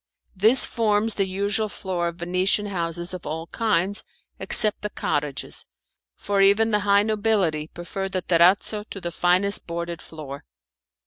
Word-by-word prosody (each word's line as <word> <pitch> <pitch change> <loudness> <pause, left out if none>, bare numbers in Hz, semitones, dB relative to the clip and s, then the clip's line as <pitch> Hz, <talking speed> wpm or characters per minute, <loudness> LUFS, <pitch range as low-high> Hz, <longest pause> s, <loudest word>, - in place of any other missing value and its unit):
This 220 +7 +4
forms 220 -1 +1
the 195 -1 0
usual 200 +3 -1
floor 185 -3 -3
of 170 - -4
venetian 185 +4 0
houses 175 -2 -3
of 180 - -7
all 160 +2 -4
kinds, 205 -1 -1 0.4
except 215 -1 +3
the 210 - -3
cottages, 145 -7 -3 0.5
for 200 -1 -1
even 205 +3 +4
the 210 - +3
high 200 0 +5
nobility 205 -8 0
prefer 195 +4 -5
the 185 -1 -3
terrazzo 185 +5 +3
to 195 - -7
the 175 -2 -5
finest 180 +4 +2
boarded 170 0 -5
floor. 145 -3 -9
190 Hz, 145 wpm, -24 LUFS, 170-205 Hz, 0.5 s, high